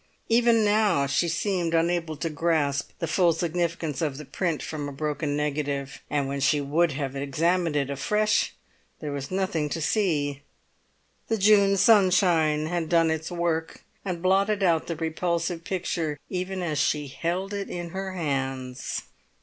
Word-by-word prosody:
Even 230 -1 +4
now 205 -8 +3
she 140 +5 +1
seemed 170 0 0
unable 165 -1 0
to 160 +3 -3
grasp 150 -3 0
the - - -2
full 170 +1 +3
significance 170 -3 -2
of 145 -4 -1
the 150 - -8
print 170 +1 -2
from 150 -2 -4
the - - -5
broken 150 +1 -2
negative; 145 -2 -2
and 140 -2 0
when 140 +1 -3
she 140 +2 +3
would 150 +3 +1
have 135 -1 -3
examined 165 +4 0
it 140 -1 0
afresh, 210 +9 +1 0.4
there 150 - -4
was 140 -1 -4
nothing 185 -5 -1
to 165 - -3
see; 150 -6 0 0.9
the 225 - 0
June 200 -1 +5
sunshine 180 -8 +4
had 165 -1 -2
done 165 -2 +4
its 160 0 -3
work, 170 -2 -2 0.2
and 180 -3 -4
blotted 195 +2 +2
out 165 -3 +2
the 170 - -2
repulsive 165 +1 -2
picture 170 -4 -2
even 185 0 -3
as 155 -4 -1
she 145 0 +1
held 175 +8 -3
it 200 -1 -4
in 175 -1 -5
her 190 +1 -4
hands. 135 -6 -3
165 Hz, 160 wpm, -26 LUFS, 145-185 Hz, 0.9 s, June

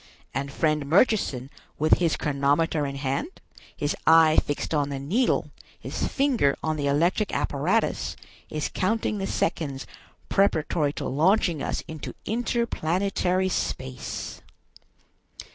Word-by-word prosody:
And 140 +1 -3
friend 155 -1 0
Murchison, 155 - +2 0.3
with 155 +1 +4
his 170 -3 +1
chronometer 145 +1 +1
in 140 - -5
hand, 140 - -3 0.4
his 145 0 -1
eye 160 -1 +7
fixed 145 +2 -3
on 145 -2 +1
the 140 - -3
needle, 190 - 0 0.3
his - - -3
finger 260 - +2
on 155 0 0
the 145 -2 -1
electric 170 +8 +2
apparatus, - - 0 0.3
is 155 -1 -3
counting 215 +1 0
the 195 - -2
seconds 140 -5 -2 0.4
preparatory 160 -6 +2
to - - -5
launching 165 +2 +2
us - - -2
into 160 -2 -7
interplanetary 195 -5 0
space." 65 - -4
155 Hz, 120 wpm, -26 LUFS, 145-195 Hz, 0.4 s, eye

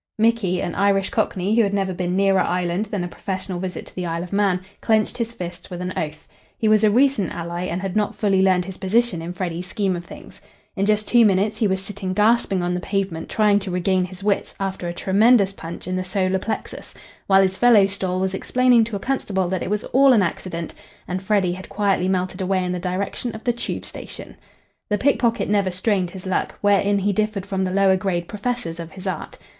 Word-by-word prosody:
Micky, 220 -5 +2
an 175 - -3
Irish 200 -1 +2
Cockney 205 -1 0
who 235 - +5
had 200 -2 +1
never 195 -2 0
been 180 0 -2
nearer 195 0 +3
Ireland 180 +3 0
than 205 -3 -3
a - - -3
professional 185 +1 -5
visit 185 0 -5
to - - -15
the 180 -1 -3
Isle 165 +1 -2
of 180 - -8
Man, 195 -3 +2 0.2
clenched 220 -1 +2
his 230 -1 -1
fists 175 -6 -8
with 180 - -6
an 180 0 -3
oath. 155 0 -4 0.3
He 220 - 0
was 215 0 +4
a 215 - +6
recent 245 - +2
ally, 170 +1 -4
and 185 +2 -3
had 190 0 -3
not 210 -1 0
fully 195 -3 +2
learned 185 -2 +3
his 190 0 -8
position 205 -2 +1
in 170 +2 -5
Freddy's 180 -1 -4
scheme 190 -1 -1
of 175 - -5
things. - - -13 0.3
In 195 +1 0
just 215 0 +1
two 240 -1 +5
minutes, 205 0 +2
he 220 - +3
was 190 0 -1
sitting 195 -2 -5
gasping 210 -3 +2
on 175 0 0
the 180 - -1
pavement, 190 -4 -3
trying 210 -2 +3
to 195 -1 -6
regain 185 +1 +1
his 185 +1 -10
wits 205 -1 0
after 190 -2 -3
a - - -2
tremendous 200 +2 +4
punch 170 -2 -8
in 185 - -2
the 185 - -1
solar 185 0 0
plexus, 220 +3 -5 0.3
while 195 0 +6
his 190 0 -1
fellow 235 -5 +6
"stall" 190 -2 -2
was 190 0 -1
explaining 250 +3 +3
to 220 -2 -5
a - - -2
constable 195 -8 -1
that 185 -1 -1
it - - -3
was 210 0 -1
all 270 +1 +6
an 215 -5 +4
accident, 170 -1 -4 0.3
and 185 +1 -3
Freddy 195 -2 +1
had 185 +1 -9
quietly 195 -2 +1
melted 185 0 -1
away 185 0 0
in 180 - -2
the 180 - -2
direction 195 +6 -3
of 220 - -9
the 240 - +1
Tube 235 - -4
station. - - -9 0.5
The 210 - +1
pickpocket 235 -1 +1
never 200 -2 +2
strained 185 0 0
his 185 +1 -10
luck, 185 - -1
wherein 205 0 +3
he 200 +1 +1
differed 215 -1 -1
from 195 -1 -2
the 185 - -2
lower 195 0 +4
grade 180 -2 -2
professors 210 -5 -3
of 165 -1 -7
his 190 0 -10
art. 190 - -4
195 Hz, 225 wpm, -22 LUFS, 180-210 Hz, 0.5 s, a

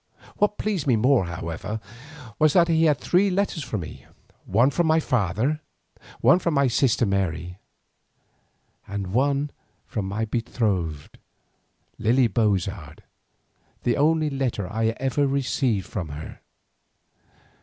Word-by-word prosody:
What 210 0 +1
pleased 195 -9 -2
me 125 - +4
more, 120 -1 +3
however, 85 +5 -5 0.6
was 155 -1 +4
that 170 -2 +5
he 165 -1 +3
had 150 -3 +4
three 190 +6 +2
letters 190 -4 -1
for 120 -3 -3
me, 85 -5 -8 0.4
one 120 +8 +3
from 170 +3 +1
my 160 +1 +4
father, 125 - 0 0.6
one 180 - +6
from 170 -3 -1
my 140 0 +4
sister 120 0 +2
Mary, 90 -2 -2 1.3
and 100 -2 -4
one 140 +3 +1 0.3
from 100 -4 -4
my 110 +3 -2
betrothed, 100 -10 -2 0.8
Lily 125 +4 +3
Bozard, 95 -7 -1 0.8
the 120 - +2
only 155 +1 +2
letter 130 -8 -2
I 110 +4 -1
ever 135 +2 +1
received 130 -7 0
from 90 -6 -5
her. 75 +2 -8
120 Hz, 125 wpm, -24 LUFS, 95-145 Hz, 1.3 s, one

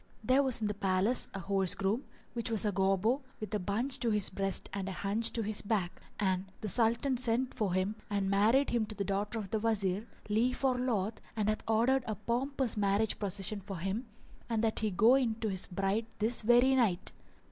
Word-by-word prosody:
[FN#403] 215 - -19
There 260 +2 +5
was 260 -4 +1
in - - 0
the 210 - -1
palace 200 +4 +2
a - - -3
horse 195 0 +1
groom 205 +7 -1 0.3
which 235 -1 -2
was 225 -1 +1
a 210 - +2
Gobbo 195 +7 +1 0.2
with 215 0 -6
a 210 - +1
bunch 235 +8 -1
to 235 -1 0
his 210 -3 +1
breast 195 0 0
and 195 -1 -3
a - - -4
hunch 200 +5 0
to 230 - -1
his 215 0 -1
back; 200 -4 -2 0.2
and 190 -2 0 0.2
the 215 - -3
Sultan 235 +5 +2
sent 250 +1 +1
for 200 -5 -1
him 190 +3 0
and 200 -1 -1
married 215 +8 +3
him 230 -3 0
to 215 - -7
the 200 - -2
daughter 205 +3 -2
of 200 -4 -6
the 220 - 0
Wazir, 210 -1 0 0.2
lief 235 +6 0
or 260 -2 +3
loath, 225 -4 -1
and 215 -1 0
hath 215 - -1
ordered 235 +4 +2
a 215 - -2
pompous 245 +3 -2
marriage 205 +1 +1
procession 200 0 0
for 195 -1 -7
him 195 +8 -3 0.4
and 225 -1 0
that 220 -1 +3
he 220 - 0
go 215 +6 +5
in 250 -5 +2
to 220 -1 -3
his 190 -1 -2
bride 195 +4 -1
this 225 +3 +1
very 240 +4 +5
night. 210 -9 +1
215 Hz, 215 wpm, -32 LUFS, 195-235 Hz, 0.4 s, There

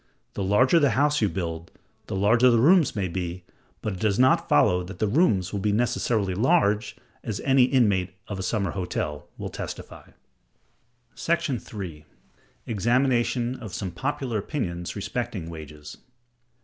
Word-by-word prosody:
The - - -4
larger 125 - +4
the 145 -3 +4
house 145 0 +2
you 105 - +3
build, 85 -2 -4 0.4
the 110 - -4
larger 115 +6 +4
the 120 - +4
rooms 160 +4 +4
may 100 -3 -1
be; 90 0 -4 0.4
but 105 - -2
it 95 - -8
does 105 -1 +1
not 130 +1 +3
follow 90 0 +4
that 90 +1 -9
the 110 - 0
rooms 105 - +2
will 100 - -1
be 105 +2 0
necessarily 110 -3 0
large—as 115 - 0
any 135 -2 +4
inmate 100 -9 +1
of 100 -2 -5
a - - -2
summer 100 -1 -1
hotel 85 -5 -4
will - - -5
testify. - - -8 1.1
§ 150 -7 -1
3. 90 -8 -8 0.6
Examination 120 +2 +1
of 110 -6 -8
some 95 -3 -4
popular 130 +1 -2
Opinions 90 - -4
respecting 100 -5 -4
Wages. 75 -2 -10
105 Hz, 150 wpm, -25 LUFS, 90-125 Hz, 1.1 s, larger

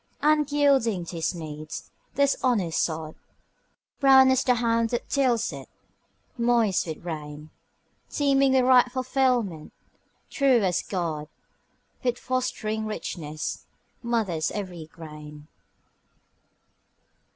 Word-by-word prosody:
And 300 -1 +3
yielding 270 -10 +2
to 170 - -7
his 165 +2 -1
needs, 155 -2 -8 0.2
this 280 0 +3
honest 205 -11 +1
sod, 160 -1 -3 0.9
Brown 265 -2 +7
as 260 0 +2
the 250 - +3
hand 230 -1 +1
that 240 - -3
tills 245 -5 +1
it, - - -9 0.7
moist 235 -6 +2
with 160 +1 -7
rain, 150 -2 -7 0.6
Teeming 275 -2 +2
with 260 -1 +4
ripe 250 -1 +5
fulfilment, 250 - 0 0.6
true 265 -6 +3
as 180 -2 +1
God, 165 -5 -3 0.8
With 245 -1 0
fostering 220 -4 -2
richness, 155 -7 -5 0.3
mothers 215 -10 -1
every 180 -6 -6
grain. 150 -2 -11
225 Hz, 105 wpm, -26 LUFS, 160-255 Hz, 0.9 s, Brown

